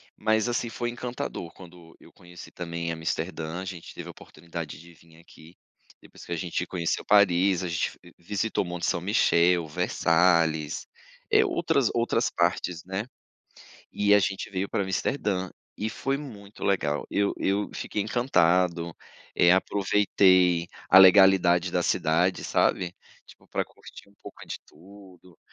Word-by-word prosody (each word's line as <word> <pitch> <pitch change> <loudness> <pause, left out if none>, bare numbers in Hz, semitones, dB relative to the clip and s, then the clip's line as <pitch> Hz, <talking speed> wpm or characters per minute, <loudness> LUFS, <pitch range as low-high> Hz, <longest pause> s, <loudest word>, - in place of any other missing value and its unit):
Mas, 110 +1 +1
assim, 120 -1 -1
foi 120 +1 -3
encantador 120 -6 -6
quando 85 -2 -15
eu - - -18
conheci 90 0 -13
também 85 -1 -5
Amsterdã, 80 0 -4
a - - -7
gente 90 -3 -9
teve - - -8
a - - -7
oportunidade 85 -2 -9
de 85 +1 -15
vim 80 0 -21
aqui 85 +1 -18 0.4
depois - - -15
que - - -11
a - - 0
gente 90 0 -3
conheceu 85 -3 -2
Paris, 95 -2 +3
a - - -2
gente, 85 -1 -1 0.2
f 85 - -16
visitou 105 +5 -2
Monte 90 -1 -4
São 85 - 0
Michel, 85 -3 +2
Versalhes, 80 -1 +1 0.4
eh, 430 0 +5
outras 160 - +1
outras 115 0 +1
partes, 85 0 -1
né? 95 +4 -4 0.9
E 105 0 +2
a 105 - +7
gente 95 +1 -2
veio 95 0 -3
pra 100 - -1
Amsterdã, 95 -1 -2 0.3
e 110 - -2
foi 135 +7 -2
muito 105 -8 -11
legal. 75 -7 0
Eu 100 0 +1
eu 100 +1 -1
fiquei 105 - -3
encantado, 90 -7 +1 0.4
eh, 85 - +5
aproveitei 95 -3 +2 0.2
a 95 - +9
legalidade 95 -2 +6
da - - 0
cidade, 85 +4 +1
sabe, 90 -1 0 0.3
tipo, - - -18
pra - - -2
curtir - - -15
um - - -27
pouco - - -12
de - - -6
tudo 90 0 -17
90 Hz, 150 wpm, -26 LUFS, 85-100 Hz, 0.9 s, a